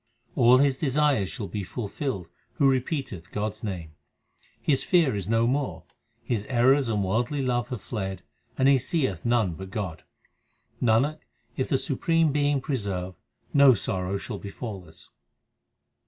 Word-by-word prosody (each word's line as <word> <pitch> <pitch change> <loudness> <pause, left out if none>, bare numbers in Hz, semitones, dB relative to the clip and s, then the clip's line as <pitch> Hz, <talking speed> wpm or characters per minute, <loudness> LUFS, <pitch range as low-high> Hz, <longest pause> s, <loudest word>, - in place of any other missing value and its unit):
All 120 +2 +6
his 135 -1 +2
desires 140 - +2
shall 115 - -4
be 105 - -4
fulfilled 100 - -4 0.3
who 140 - +3
repeateth 130 - -1
God 105 +1 -1
s - - -17
name. 90 -7 -5 0.7
His 135 -3 +1
fear 165 - +3
is 100 -1 -4
no 115 0 +3
more, 135 +3 -1 0.4
his 110 -4 -2
errors 130 +1 +3
and 105 -3 0
worldly 120 +9 0
love 120 -2 0
have 125 -6 -5
fled, 95 -5 -4 0.3
and 130 - +3
he 135 -1 +6
seeth 130 - -1
none 115 -7 +2
but 95 +3 -8
God. 95 -5 -4 0.8
Nanak, 125 +7 +2 0.4
if 130 - -2
the 135 - +3
supreme 165 +3 +1
Being 145 -1 +1
preserve, 100 -9 -3 0.4
no 140 -3 +7
sorrow 95 -1 -2
shall 100 +1 -6
befall 100 -2 -7
us. 80 -1 -15
120 Hz, 150 wpm, -26 LUFS, 100-135 Hz, 0.8 s, no